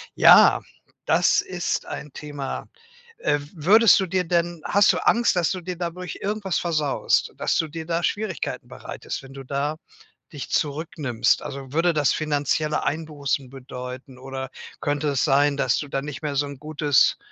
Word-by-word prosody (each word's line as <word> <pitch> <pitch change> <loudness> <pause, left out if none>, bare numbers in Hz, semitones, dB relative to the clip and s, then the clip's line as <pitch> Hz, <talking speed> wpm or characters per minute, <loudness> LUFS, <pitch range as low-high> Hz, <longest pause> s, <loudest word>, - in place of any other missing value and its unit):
Ja, - - +7 0.4
das - - +3
ist - - -3
ein 150 -2 -7
Thema. 145 -2 -5 0.5
Äh, 145 - +1 0.2
würdest 200 +8 +6
du 190 - 0
dir 185 0 0
denn 170 -1 -1
hast 200 0 +4
du - - -3
Angst, 235 -3 +3
dass 175 -3 +2
du 185 - -3
dir 180 +1 -5
dadurch 175 0 -5
irgendwas 200 -2 -1
versaust? 155 -5 0
Dass - - 0
du 160 - +1
dir 160 +1 -7
da 165 +1 -1
Schwierigkeiten 205 -6 -3
bereitest, - - -7
wenn 135 0 -13
du 135 0 -9
da 140 +3 -2 0.6
dich 145 -3 -7
zurücknimmst? 145 -5 0
Also, 135 -2 -7
würde 170 +2 +3
das 150 -3 +2
finanzielle 150 0 0
Einbußen 145 -4 -2
bedeuten? 125 0 -9
Oder 130 0 -6 0.3
könnte 145 +1 -1
es 135 -3 +1
sein, 145 0 +3
dass 130 -3 +2
du 145 - -4
da 135 - -2
nicht 145 0 -7
mehr 150 -2 -3
so 145 - +2
'n 140 -1 -8
gutes, 150 -1 +2
150 Hz, 165 wpm, -24 LUFS, 140-170 Hz, 0.6 s, Ja